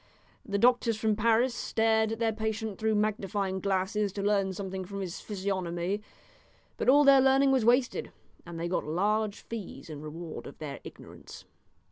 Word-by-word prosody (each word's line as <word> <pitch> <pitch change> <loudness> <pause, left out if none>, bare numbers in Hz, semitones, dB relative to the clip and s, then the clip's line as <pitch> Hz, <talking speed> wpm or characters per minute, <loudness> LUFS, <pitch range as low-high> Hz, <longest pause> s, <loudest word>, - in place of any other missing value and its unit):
The 200 -1 -2
doctors 240 0 +3
from 220 -1 +1
Paris 230 +3 +3
stared 220 -1 +1
at - - -5
their 225 -1 +1
patient 220 -1 -3
through 220 0 +1
magnifying 205 -2 -1
glasses 200 +1 0
to 200 - -4
learn 200 -2 +2
something 190 0 -5
from 200 +2 -7
his 185 -2 -5
physiognomy. 190 -1 -3 0.8
But - - +1
all 290 +2 +7
their 275 -1 +7
learning 270 +1 +4
was 260 -3 +3
wasted, 245 +1 +2 0.3
and 170 -1 -8
they 170 - -2
got 180 - -1
large 205 +6 0
fees 215 -7 -8
in 150 -1 -7
reward 160 +2 -7
of - - -11
their 145 -3 -6
ignorance." - - -12
210 Hz, 165 wpm, -29 LUFS, 190-225 Hz, 0.8 s, all